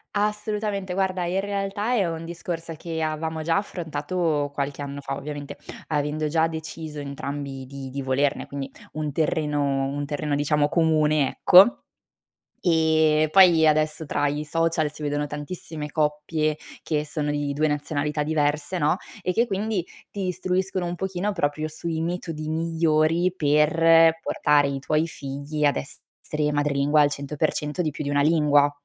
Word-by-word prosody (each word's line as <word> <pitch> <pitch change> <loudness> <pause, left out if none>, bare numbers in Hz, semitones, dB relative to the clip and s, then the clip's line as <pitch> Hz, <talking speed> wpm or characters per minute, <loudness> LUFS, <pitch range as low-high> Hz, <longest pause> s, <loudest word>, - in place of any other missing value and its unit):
Assolutamente, 210 -2 -1
guarda 185 -2 0
in 185 +2 0
realtà 200 +3 -2
è 200 -7 +2
un 165 0 -5
discorso 170 -1 -5
che, 160 +1 -5
avevamo 155 0 -2
già 165 +3 +2
affrontato 160 -4 -2
qualche 140 0 -3
anno 140 0 -5
fa, 135 0 -4
ovviamente, 145 0 -6 0.3
avendo 150 0 -1
già 160 +1 +2
deciso 160 -1 -6
entrambi 140 -1 -5
di 135 0 -7
di 140 +1 -4
volerne, 135 +1 0
quindi 140 -1 -6 0.2
un 155 -1 -3
terreno 145 -3 0
un 145 +1 -3
terreno 145 0 -2
diciamo 145 +1 +2
comune, 155 -3 +2
ecco. 190 +7 +6 0.8
Ehm, 160 -2 +3
poi 175 -4 +7
adesso 155 +1 +2
tra 145 -1 0
i 145 +1 -2
social 165 -1 0
si 150 - -10
vedono 145 0 -1
tantissime 150 +1 -6
coppie 150 0 0 0.2
che 150 -1 -1
sono 150 -1 -2
di 145 -1 -1
2 155 +2 +2
nazionalità 150 0 -1
diverse, 150 +2 0
no, 155 0 +2 0.3
e 180 - 0
che 230 +6 +2
quindi, 205 -1 -1 0.3
ti 195 -2 -3
istruiscono 185 +1 -1
un 175 0 -3
pochino 190 +2 -2
proprio 155 -4 -1
sui 160 +1 -4
metodi 165 -2 -4
migliori 165 +1 +2
per 165 +1 +4
portare 145 -3 +2
i 135 -1 -3
tuoi 155 +3 +1
figli 145 0 -4
ad 145 - +3
essere 150 +1 -4
madrelingua 145 0 +2
al 145 -1 +4
100% 150 +3 -2
di 160 - +1
più 150 +1 -6
di 140 - -2
una 145 0 +2
lingua. 145 -2 +4
155 Hz, 150 wpm, -24 LUFS, 145-170 Hz, 0.8 s, poi